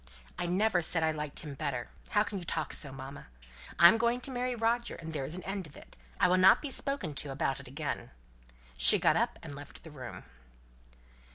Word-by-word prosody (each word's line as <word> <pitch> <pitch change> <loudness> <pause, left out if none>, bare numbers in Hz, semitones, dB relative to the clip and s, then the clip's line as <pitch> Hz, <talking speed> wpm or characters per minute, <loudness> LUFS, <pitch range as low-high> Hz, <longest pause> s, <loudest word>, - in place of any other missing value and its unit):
"I 175 - -1
never 185 +1 +2
said 165 0 +1
I 160 - +2
liked 150 -2 -3
him 150 -4 -7
better, 135 -4 -4 0.2
how 210 - +3
can 205 -2 -5
you - - -7
talk 160 -2 -2
so, 140 - -3
mamma? 135 +1 -9 0.5
I'm 175 +6 +8
going 235 +1 +1
to 270 - 0
marry 250 0 -2
Roger, 235 +1 0
and 160 -1 -8
there's 145 +2 -3
an 185 - -7
end 195 -3 -4
of 145 - -15
it. - - -15 0.2
I - - +5
will 180 +1 +3
not 190 +1 +7
be 290 - -5
spoken 275 - 0
to 145 0 -2
about 135 0 -1
it 140 - -9
again." 145 +4 -4 0.7
She - - +7
got - - +3
up - - 0
and - - -7
left 145 0 -12
the 160 - -11
room. 130 -4 -9
165 Hz, 210 wpm, -31 LUFS, 145-205 Hz, 0.7 s, I'm